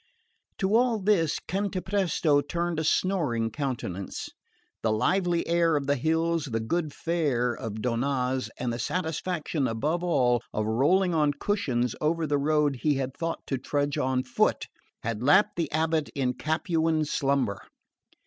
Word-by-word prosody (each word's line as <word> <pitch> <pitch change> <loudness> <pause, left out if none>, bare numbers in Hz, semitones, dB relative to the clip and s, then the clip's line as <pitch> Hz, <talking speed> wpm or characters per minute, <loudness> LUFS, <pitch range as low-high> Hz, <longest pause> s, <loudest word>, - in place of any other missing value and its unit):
To 195 +2 +1
all 240 -1 +3
this 190 -6 +2
Cantapresto 185 -6 0
turned 170 0 -2
a - - -1
snoring 145 -10 +1
countenance. 120 -10 -4 0.5
The 110 - +1
lively 175 - +1
air 170 -1 +2
of 145 -1 0
the 140 +1 +2
hills, 160 +3 0
the 115 -5 -2
good 155 +7 -1
fare 140 -8 0
of 110 -2 -6
Donnaz, 125 +1 0
and 120 -2 -2
the 120 - -4
satisfaction, 165 -4 -2
above 150 +10 -1
all, 125 -9 +2
of 110 - -1
rolling 170 - +2
on 150 -2 +2
cushions 125 - -1
over 165 +2 +1
a - - 0
road 150 -1 +2
he 150 +3 +1
had 135 -1 -3
thought 165 0 -4
to 135 - -2
trudge 145 +2 -1
on 130 0 +1
foot, 130 - +1 0.4
had 115 -1 -3
lapped 190 +10 +4
the 165 -4 -1
abate 160 -1 0
in 130 -3 0
Capuan 160 +1 0
slumber. 135 -8 0
150 Hz, 150 wpm, -27 LUFS, 125-170 Hz, 0.5 s, lapped